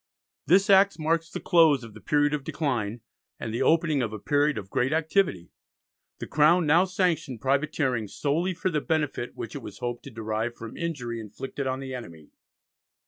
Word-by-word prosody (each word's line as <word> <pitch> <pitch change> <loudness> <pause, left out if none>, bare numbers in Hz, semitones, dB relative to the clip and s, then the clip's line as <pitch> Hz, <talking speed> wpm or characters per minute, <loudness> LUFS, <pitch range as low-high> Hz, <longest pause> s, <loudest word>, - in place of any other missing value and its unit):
This 190 +4 +5
Act 195 -2 +5
marks 165 +1 0
the - - -5
close 160 -7 +4
of 115 -2 -10
the 110 - -13
period 145 +5 +2
of 145 -2 -2
decline, 120 -8 -2 0.4
and 110 - -5
the 115 - -2
opening 155 0 +3
of 115 -3 -2
a 110 - -5
period 145 +6 +1
of 100 -2 -7
great 125 +3 +1
activity. 160 - 0 0.7
The - - -6
Crown 160 +3 +4
now 165 +5 +5
sanctioned 180 - -1
privateering 135 -3 0
solely 165 - -1
for 185 - -1
the 150 -2 0
benefit 150 -6 -2
which 115 - -6
it 145 - -6
was - - -9
hoped 120 -1 -4
to - - -7
derive 110 0 -3
from 115 -1 -9
injury 125 -9 -4
inflicted 130 +6 -6
on 130 +1 -2
the 135 -1 -6
enemy. 85 -12 -9
140 Hz, 185 wpm, -26 LUFS, 115-160 Hz, 0.7 s, This